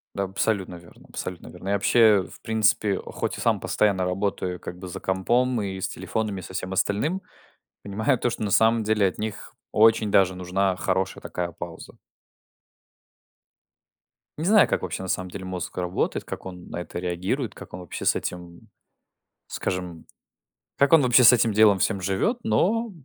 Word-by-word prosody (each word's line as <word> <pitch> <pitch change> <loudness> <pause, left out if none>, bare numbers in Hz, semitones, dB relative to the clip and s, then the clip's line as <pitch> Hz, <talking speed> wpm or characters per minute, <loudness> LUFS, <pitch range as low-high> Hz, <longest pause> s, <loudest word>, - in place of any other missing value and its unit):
Да, 100 - 0
абсолютно 95 -1 -1
верно 85 0 -16
абсолютно 90 -2 -6
верно. 90 +2 -9
Я 100 - +2
вообще, 105 0 +4
в - - -13
принципе, 110 -2 +2
а - - -10
хоть - - -3
и - - -5
сам - - +1
постоянно 100 -3 +1
работаю 90 -1 -2
как 90 - -8
бы 90 0 -8
за 90 - -7
компом 120 +6 +1
и 95 -1 -4
с - - -1
телефонами, 105 -3 -3
и - - -11
со 95 - -10
всем 95 +1 -4
остальным, 140 - 0 0.6
понимаю 110 +6 0
то, - - 0
что 115 - -5
на 105 - -1
самом 110 +3 +4
деле 105 -2 +2
от 90 - -3
них 110 -1 -5 0.2
очень 110 -1 +4
даже 95 -2 +4
нужна 95 +1 0
хорошая 95 +1 -1
такая 85 -1 -4
пауза. 85 +1 -9 2.4
Не 155 - -3
знаю 210 +1 +5
как - - -1
вообще 95 0 -4
на 95 - -6
самом 90 0 -2
деле 95 -1 -7
мозг 90 -2 -5
работает 90 0 -1
как - - -8
он 90 -1 -9
на - - -6
это 85 - -7
реагирует 90 +8 -2
как - - -12
он 90 - -6
вообще 90 - -7
с - - +4
этим 90 - -3 0.2
м - - -22 0.8
скажем 90 -3 -4 0.7
как 140 +3 +3
он 165 - +8
вообще 125 0 +5
с 115 - +10
этим 115 -2 +3
делом 105 -1 +5
всем 100 +1 0
живет. 100 - 0
Но 220 - +1
100 Hz, 180 wpm, -25 LUFS, 90-110 Hz, 2.4 s, с